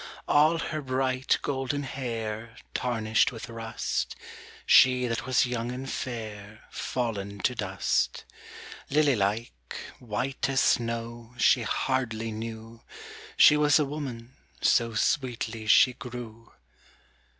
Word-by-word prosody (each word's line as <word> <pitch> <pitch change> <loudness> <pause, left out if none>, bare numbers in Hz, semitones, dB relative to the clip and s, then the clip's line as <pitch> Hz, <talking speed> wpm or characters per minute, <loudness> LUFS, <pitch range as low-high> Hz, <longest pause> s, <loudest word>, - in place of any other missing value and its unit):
All 155 +3 +4
her 155 -2 -3
bright 130 0 0
golden 140 +1 -2
hair 115 -4 -5 0.2
Tarnished 115 -3 +1
with 115 0 -8
rust, 115 -1 -3 0.5
She 125 -1 +6
that 115 +1 -3
was 130 0 +3
young 120 -1 -3
and 130 +2 -6
fair 110 -5 -6
Fallen 100 -5 -3
to - - +1
dust. - - -1 0.6
lily 145 -1 +3
like, 105 +3 -1 0.5
white 125 +4 -2
as 135 -1 +2
snow, 115 0 -1
She 125 +1 +4
hardly 115 -2 -1
knew 115 +1 -7 0.6
She 150 - +8
was 150 0 +4
a 150 - +2
woman, 135 -4 -6 0.2
so 115 -1 +2
Sweetly 115 -2 -1
she 125 +4 +6
grew. 120 -2 -9
120 Hz, 115 wpm, -27 LUFS, 115-130 Hz, 0.6 s, She